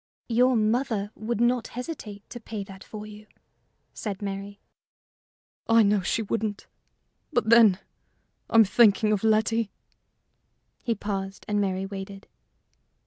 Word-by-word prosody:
"Your 250 +2 +4
mother 220 -1 0
would 220 0 -3
not 240 0 +2
hesitate 220 -7 -7
to 240 - -7
pay 220 -2 -6
that 195 -1 -12
for 215 -1 -8
you?" 210 0 -12 0.7
said 200 -3 -5
Mary. 200 0 -6 1.1
"I 230 0 +6
know 205 -1 +3
she 220 +5 -1
wouldn't; 215 -1 -3 0.7
but, 240 -5 +1
then, 225 -5 +7 0.7
I'm 225 -1 +7
thinking 215 0 +4
of 210 -1 0
Letty." 220 0 +2 1.1
He 235 -3 -1
paused, 195 -1 -5
and 205 -1 +1
Mary 190 -1 -1
waited. 195 0 -8
215 Hz, 125 wpm, -26 LUFS, 200-230 Hz, 1.1 s, then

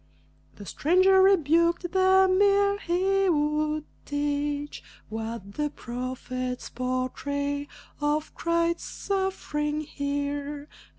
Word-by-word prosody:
The 205 - -10
stranger 370 - +4
rebuked 340 -1 +3
them 375 0 +4
ere 400 0 +4
he 385 +2 +1
would 300 -1 0 0.2
teach 290 0 -2 0.3
What 220 -2 -5
the 295 +4 -1
prophets 255 -1 -5
portray 285 +3 -2 0.3
of 300 +1 -1
Christ's 335 0 0
sufferings 310 -6 -2
here. 285 0 -3
295 Hz, 85 wpm, -27 LUFS, 285-365 Hz, 0.3 s, stranger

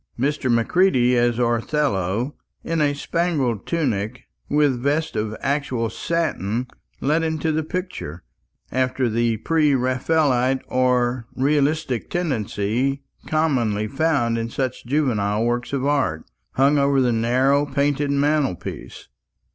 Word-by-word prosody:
Mr. 135 -1 0
Macready 125 0 +3
as 120 -1 +2
Othello, 120 -2 0 0.3
in 165 -1 -1
a 145 -1 +2
spangled 145 - -1
tunic, 125 - -1 0.3
with 145 -4 +2
vest 150 +4 0
of 110 0 -2
actual 130 -5 -1
satin 125 - -1 0.4
let 150 +4 +2
into 160 -1 -1
the 155 +1 0
picture, 155 - -5 0.5
after 130 0 0
the 115 0 +1
pre 150 +4 +2
Raphaelite 130 0 +1
or 125 -2 +1
realistic 145 -1 0
tendency 135 - -1 0.2
commonly 120 -10 +1
found 135 -3 +1
in 115 0 -3
such 130 0 -3
juvenile 115 -7 +1
works 120 +1 -1
of 140 -1 -1
art, 140 - 0 0.3
hung 140 +2 +3
over 140 0 +3
the 125 -2 +2
narrow 130 +5 +2
painted 145 +1 0
mantelpiece. 140 - -1
130 Hz, 115 wpm, -22 LUFS, 120-150 Hz, 0.5 s, Macready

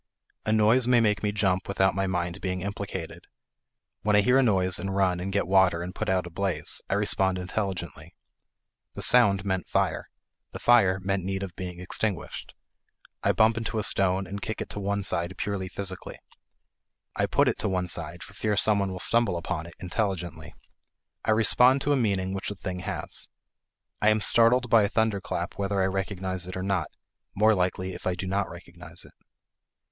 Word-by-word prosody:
A - - +2
noise 110 +3 +4
may 125 -1 +5
make 105 -2 +2
me 105 - 0
jump 95 -3 0
without 95 -1 +2
my 95 0 -1
mind 90 0 -2
being 90 -1 -3
implicated. 100 -3 -6 0.7
When 105 -1 +2
I 105 - +6
hear 125 +6 +4
a - - +5
noise 95 -7 +2
and 95 -1 -3
run 95 -2 +2
and 95 +2 -4
get 100 +1 0
water 95 -2 +3
and 90 +1 -6
put - - -3
out 95 -1 +1
a 85 - -9
blaze, 95 +1 -1
I - - +1
respond 95 -2 +1
intelligently; 95 +1 -5 0.8
the - - -4
sound 100 -6 +4
meant 95 -2 -2
fire, - - 0 0.4
and - - -6
fire 100 -6 +4
meant 95 0 -1
need 95 +1 -3
of 90 -3 -7
being 90 -2 -6
extinguished. 95 +2 -3 0.7
I - - +3
bump 110 +1 +3
into 115 -1 -3
a 110 - 0
stone, 95 -1 +2
and 100 +2 -7
kick 110 +2 -4
it - - -5
to - - -5
one 100 0 -1
side 85 -1 0
purely 100 -2 -3
physically. 95 -1 -6 1.0
I - - +1
put - - +2
it - - 0
to 105 - 0
one 90 -1 -1
side 85 0 -4
for - - -13
fear 105 -2 -1
some 105 +1 +4
one 100 -1 -1
will 95 - -6
stumble 115 -3 +3
upon 85 -1 -4
it, 85 - -13
intelligently; 90 -5 -3 0.7
I - - -2
respond 125 +4 +5
to 145 - +1
a - - +3
meaning 100 -6 0
which 95 - -4
the 105 - -5
thing 90 -1 -5
has. - - -3 0.7
I 105 - +5
am 110 0 +3
startled 120 +3 +4
by 115 -1 +5
a 100 - +1
thunderclap 100 -5 -2
whether 100 0 -1
I 95 - +3
recognize 95 -1 -2
it 90 - -6
or 95 - -3
not 95 -6 0 0.5
more 110 +2 +4
likely, 95 0 -1
if - - -7
I 90 - 0
do 90 - -5
not 95 +1 -1
recognize - - -7
it. - - -17
95 Hz, 195 wpm, -26 LUFS, 90-105 Hz, 1.0 s, I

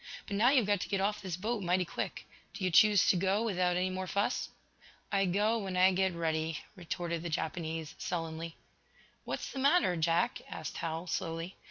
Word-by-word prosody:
"But 200 - -4
now 225 +5 +5
you've 260 -5 +4
got 205 -2 +1
to - - -4
get 195 -1 0
off 210 +2 0
this 185 -4 -4
boat 215 +3 -2
mighty 180 0 +1
quick. - - -5 0.3
Do 200 - -5
you 185 - +1
choose 205 +3 +6
to - - +5
go 195 +4 +1
without 180 -5 +1
any 185 +1 0
more 185 0 -3
fuss?" 200 +2 0 0.6
"I 195 -1 +3
go 210 +5 +2
when 190 -3 -3
I 185 +1 +6
get 190 -1 +1
ready," 160 -1 -1 0.2
retorted 170 -2 -3
the 170 - -4
Japanese, 160 0 -3
sullenly. 165 -1 -4 0.7
"What's - - -4
the 270 - -5
matter, 280 - +4
Jack?" 165 +1 +1
asked - - -6
Hal, 165 +1 -3
slowly. 165 +1 -3
180 Hz, 190 wpm, -32 LUFS, 165-200 Hz, 0.7 s, choose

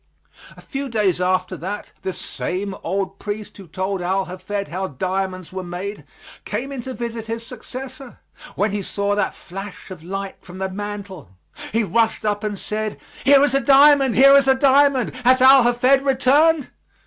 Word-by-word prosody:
A - - -13
few 275 -1 -5
days 205 -6 +1
after 185 0 0
that, 195 +5 -6
this 190 - -4
same 190 +2 -4
old 195 +2 -3
priest 210 0 -6
who 195 -3 -12
told 190 +3 -3
Al 190 +2 0
Hafed 200 +2 -5
how 190 +2 -3
diamonds 185 +4 -4
were 190 - -4
made, 180 +4 -6 0.4
came 270 +3 -4
in 270 -3 -5
to 260 +1 -7
visit 230 -2 -5
his 230 +1 -5
successor, 255 +1 -9 0.4
when 205 +1 0
he 205 0 -2
saw 200 +1 -2
that 205 - -1
flash 195 +1 -9
of 180 -4 -9
light 195 +2 -5
from 180 0 -11
the 190 0 -3
mantel. 200 - -7 0.4
He 230 +1 +1
rushed 220 +3 0
up 205 0 -1
and 210 -1 -3
said, 215 +2 -4 0.3
"Here 280 0 +7
is 285 - +2
a 275 - +2
diamond 275 -2 +5
here 275 +2 +7
is 275 -1 +5
a 265 - +5
diamond! 275 -1 +3
Has 255 +2 +5
Al 265 +1 +8
Hafed 250 +3 +3
returned?" 280 +3 +3
210 Hz, 175 wpm, -21 LUFS, 190-260 Hz, 0.4 s, Al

